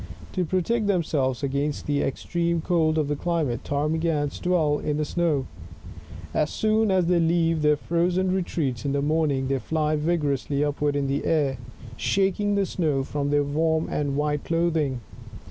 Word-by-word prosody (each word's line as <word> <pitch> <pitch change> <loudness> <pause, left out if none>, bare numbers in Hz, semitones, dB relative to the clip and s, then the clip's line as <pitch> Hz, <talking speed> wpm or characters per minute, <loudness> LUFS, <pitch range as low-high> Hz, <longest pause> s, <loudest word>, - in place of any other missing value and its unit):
To 185 - 0
protect 200 +6 0
themselves 150 -9 0
against 140 +2 -1
the 145 -1 0
entreme 170 +4 -1
cold 160 -3 +2
of 155 -2 +1
the 145 - -1
climate, 150 -7 -1
Ptarmigans 150 0 -1
dwell 160 -5 +1
in 150 -1 -2
the 150 - 0
snow. 155 -4 0 0.9
As 150 - +1
soon 220 0 +1
as 185 -2 +3
they 175 0 +3
leave 165 -1 +2
their 150 0 +4
frozen 175 +4 0
retreats 150 -10 -2
in 140 - -1
the 140 0 0
morn 155 +1 +2
ing, 135 -1 -1
they 135 0 0
fly 155 +2 0
vigorously 150 -3 0
upward 145 0 0
into 140 -1 0
the - - -7
air, 140 -5 +1 0.4
shaking 200 +1 +1
the 200 -1 +2
snow 150 -8 0
from 145 +1 -2
their 145 0 +3
warm 160 +3 0
and 145 -2 -1
white 150 0 0
clothing. 165 -6 0
155 Hz, 165 wpm, -25 LUFS, 145-170 Hz, 0.9 s, their